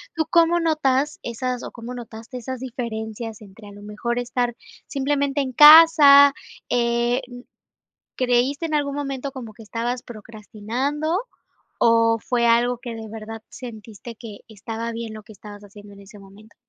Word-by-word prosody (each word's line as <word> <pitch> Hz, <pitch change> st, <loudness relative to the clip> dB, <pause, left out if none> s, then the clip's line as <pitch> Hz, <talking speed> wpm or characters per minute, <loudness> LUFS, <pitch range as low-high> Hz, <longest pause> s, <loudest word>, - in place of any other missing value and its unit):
¿tú 320 Hz, -1 st, 0 dB
cómo 340 Hz, 0 st, +3 dB
notas 300 Hz, -3 st, 0 dB
esas, 250 Hz, +1 st, -4 dB
o -, -, -7 dB
cómo 240 Hz, +1 st, -9 dB
notaste 235 Hz, +1 st, -9 dB
esas 255 Hz, +1 st, -6 dB
diferencias 225 Hz, -3 st, -6 dB
entre, 205 Hz, +1 st, -14 dB
a -, -, -12 dB
lo 205 Hz, 0 st, -13 dB
mejor, 235 Hz, +3 st, -3 dB
estar 245 Hz, 0 st, -2 dB, 0.3 s
simplemente 280 Hz, 0 st, -1 dB
en 260 Hz, -2 st, -4 dB
casa?, 295 Hz, -1 st, +8 dB, 0.4 s
eh, 240 Hz, +1 st, +1 dB
n, 245 Hz, 0 st, -12 dB, 0.7 s
¿creíste 255 Hz, +5 st, 0 dB
en 310 Hz, -, -4 dB
algún 285 Hz, -2 st, -1 dB
momento 275 Hz, -1 st, -4 dB
como 240 Hz, -5 st, -9 dB
que 225 Hz, +1 st, -14 dB
estabas 235 Hz, +3 st, -3 dB
procrastinando, 240 Hz, -, -4 dB, 0.6 s
o 230 Hz, 0 st, +4 dB
fue 235 Hz, +2 st, 0 dB
algo 240 Hz, +1 st, +2 dB
que 240 Hz, -1 st, -7 dB
de 220 Hz, -1 st, -8 dB
verdad, 220 Hz, 0 st, -9 dB
sentiste 230 Hz, -1 st, -10 dB
que 215 Hz, -3 st, -10 dB
estaba 225 Hz, +2 st, -6 dB
bien 230 Hz, -1 st, -6 dB
lo 215 Hz, -, -10 dB
que 215 Hz, -, -14 dB
estabas 205 Hz, 0 st, -12 dB
haciendo 205 Hz, 0 st, -14 dB
en 200 Hz, -, -15 dB
ese 200 Hz, +2 st, -15 dB
momento? 200 Hz, +3 st, -17 dB
240 Hz, 160 wpm, -22 LUFS, 220-270 Hz, 0.7 s, casa